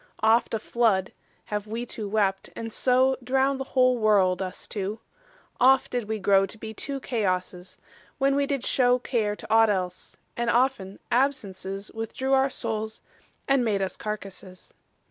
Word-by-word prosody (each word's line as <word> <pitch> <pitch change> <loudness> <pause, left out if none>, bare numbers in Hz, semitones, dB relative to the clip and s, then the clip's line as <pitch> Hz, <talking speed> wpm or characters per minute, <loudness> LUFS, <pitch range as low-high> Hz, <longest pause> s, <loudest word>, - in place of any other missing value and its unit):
Oft 225 +1 +3
a - - +1
flood 215 -4 +1 0.3
Have 210 0 -4
wee 230 +3 -4
two 215 -3 -5
wept, 195 -2 0
and 225 -1 -6
so 260 +1 +3
Drownd 265 +2 +1
the - - -2
whole 255 -1 +4
world, 195 -4 +3
us 185 0 -5
two; 205 +1 -4 0.6
oft 265 +1 +4
did 240 -4 -3
we 220 - -1
grow 195 -1 +3
To 220 - -11
be 220 0 -7
two 275 +5 -4
Chaosses, 185 -7 -2 0.4
when 275 0 +2
we 280 0 +1
did 275 -3 -2
show 250 -1 +3
Care 225 -4 -1
to 215 +1 -5
ought 225 0 +6
else; 180 -3 -3 0.2
and 235 0 -1
often 235 -6 +1
absences 205 -7 -1
Withdrew 225 +4 -2
our 270 0 +4
soules, 220 -3 -4 0.4
and 275 -2 +3
made 205 -4 0
us 190 - -3
carcasses. 195 -3 -8
220 Hz, 165 wpm, -26 LUFS, 195-255 Hz, 0.6 s, ought